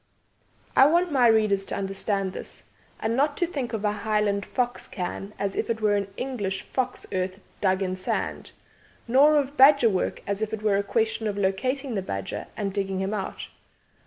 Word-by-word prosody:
I 270 - +8
want 345 +2 +2
my 255 -4 +5
readers 215 -3 +3
to - - -4
understand 195 0 -2
this, - - -7 0.4
and 225 +1 0
not 285 +3 +1
to 350 - +2
think 275 -8 -4
of 220 -2 -3
a 210 - +3
Highland 210 -1 0
fox 245 -1 -2
cairn 195 +2 -5
as 200 -1 -2
if - - -2
it 225 -1 0
were 210 -1 +2
an 200 -1 -1
English 205 -8 -3
fox 255 -1 -3
earth 185 +1 -2 0.2
dug 190 -1 +2
in 185 0 -2
sand; 185 - -3 0.6
nor 280 +6 +6
of 285 -1 0
badger 270 -4 +7
work 185 - -2
as 200 +1 -2
if 220 0 -2
it 215 - -12
were 205 -2 +3
a - - +2
question 220 +1 0
of 205 -1 -2
locating 255 +8 -1
the 200 - -1
badger 95 - -5
and 205 -2 -1
then 200 - +1
digging 190 -1 -3
him 190 +2 -1
out. 195 -3 -4
210 Hz, 195 wpm, -26 LUFS, 195-250 Hz, 0.6 s, I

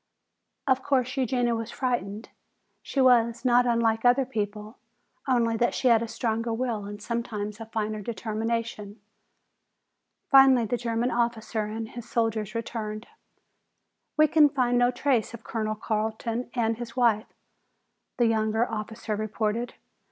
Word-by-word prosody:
Of 265 -1 +2
course, 255 -2 0
Eugenia 245 -2 +1
was 225 0 -3
frightened. 230 -5 -3 0.5
She 275 - -4
was 240 -2 +4
not 245 0 +4
unlike 230 -2 +2
other 250 +2 +4
people, 210 -1 -5 0.5
only 235 -3 +2
that 240 +1 +1
she 255 - +2
had 230 -1 +5
a 230 - -2
stronger 230 0 -2
will 225 -3 -2
and 205 0 -7
sometimes 210 -2 -4
a 225 - -8
finer 215 -1 -3
determination. 220 0 -3 1.3
Finally 270 -3 +6
the 235 - -1
German 235 +1 -1
officer 235 -2 -1
and 220 +1 -5
his 240 -1 -9
soldiers 225 -2 -1
returned. 220 -1 -4 1.1
"We 310 0 +6
can 300 -1 +5
find 245 -3 +1
no 245 0 +4
trace 245 -3 0
of 225 - -13
Colonel 215 -2 -2
Carton 220 +2 -2
or 225 -1 +2
his 230 0 -8
wife," 230 -3 +3 0.9
the 240 - +3
younger 220 +1 +1
officer 220 0 -4
reported. 215 +2 -2
230 Hz, 135 wpm, -27 LUFS, 220-245 Hz, 1.3 s, Finally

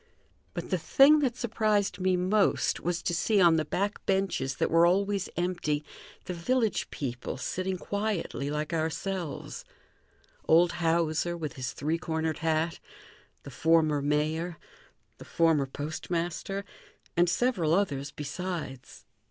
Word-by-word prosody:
But - - -5
the - - +1
thing 295 +2 +6
that 255 -4 0
surprised 215 -5 0
me 185 0 +2
most 195 +3 +2
was 175 0 -2
to 175 - 0
see, 200 +5 +2
on 170 -3 +6
the 155 - +1
back 200 +7 -2
benches 190 -9 0
that - - 0
were 165 +1 +6
always 195 +1 +1
empty, 170 -4 -1 0.4
the 180 - -4
village 220 +4 0
people 125 -3 -4
sitting 185 +6 -2
quietly 200 -8 -2
like 150 +2 -3
ourselves; 165 0 -3 0.8
old 170 +2 +5
Hauser, 170 0 0
with 155 -2 -4
his 130 -3 -4
three 160 +3 -1
cornered 160 -1 -2
hat, 160 +1 0 0.6
the - - -9
former 160 -3 +3
mayor, 155 +4 0 0.6
the - - -9
former 160 -5 +2
postmaster, 170 +7 -3 0.5
and 175 0 +4
several 175 -7 +2
others 145 -8 0
besides. 150 -3 -6
170 Hz, 130 wpm, -29 LUFS, 155-190 Hz, 0.8 s, thing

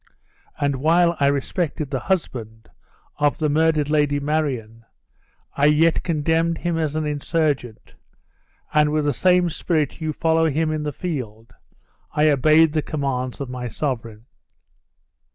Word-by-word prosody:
And 140 -1 0
while 170 +4 +3
I 140 - +3
respected 145 +1 -2
the 135 - -1
husband 115 - -3 0.5
of 145 -1 +1
the 155 -1 0
murdered 155 -1 +2
Lady 145 -1 +1
Marion, 135 -7 -2 0.7
I 140 +1 +3
yet 160 +2 +3
condemned 165 +1 0
him 175 -1 -2
as 155 -2 -1
an 155 0 -1
insurgent; 145 -5 -2 0.8
and 150 0 +3
with 155 -1 0
the 145 - +1
same 180 -2 +3
spirit 155 -2 -1
you 155 -1 -1
follow 160 +1 +1
him 155 +2 0
in 155 -1 -2
the 150 0 -3
field, 125 - -6 0.6
I 150 0 +3
obeyed 155 +3 +4
the 155 - +1
commands 135 -4 -3
of 140 - -4
my 125 0 -5
sovereign." 115 -4 -4
150 Hz, 140 wpm, -22 LUFS, 135-160 Hz, 0.8 s, obeyed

